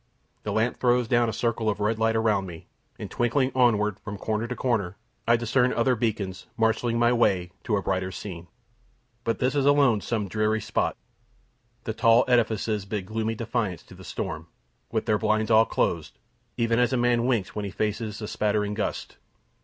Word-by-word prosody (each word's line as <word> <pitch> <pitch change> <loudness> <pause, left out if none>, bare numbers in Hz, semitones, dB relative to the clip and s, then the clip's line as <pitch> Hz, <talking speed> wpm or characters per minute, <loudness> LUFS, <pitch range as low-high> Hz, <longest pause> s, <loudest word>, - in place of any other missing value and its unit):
The - - -4
lamp 115 +3 0
throws 125 -1 +2
down 120 -1 +3
a - - -1
circle 110 0 -1
of 105 - -2
red 110 +2 0
light 115 0 +2
around 105 -4 +1
me; 85 -2 -10 0.3
and - - -7
twinkling 130 +3 +1
onward 105 -5 +2
from 105 -2 -7
corner 110 +3 -2
to 125 - -4
corner, 105 -8 -1 0.3
I 120 - +6
discern 120 +2 +2
other 125 +2 +2
beacons 105 -5 -3
marshalling 115 +1 +1
my 120 +1 +3
way 95 -7 +2
to 105 - +1
a 100 - -3
brighter 95 -1 -1
scene. 90 -3 -7 0.8
But 115 - 0
this 130 0 0
is 140 -1 +1
alone 140 -7 +4
some 110 0 -1
and 100 - -8
dreary 110 0 +1
spot. - - -1 0.9
The 110 - -3
tall 115 +1 +4
edifices 110 -4 +1
bid 100 -1 -4
gloomy 110 +2 -2
defiance 115 -4 -2
to - - -16
the - - -13
storm, - - -5 0.4
with - - -1
their 105 -1 +2
blinds 110 +1 +1
all 110 +1 +6
closed, - - -1 0.4
even 115 0 +2
as 125 0 +3
a 130 - +1
man 120 0 +2
winks 115 -8 0
when 105 -1 -3
he - - -3
faces 105 +2 -3
a - - -3
spattering 105 0 0
gust. 105 0 -4
110 Hz, 190 wpm, -26 LUFS, 105-120 Hz, 0.9 s, I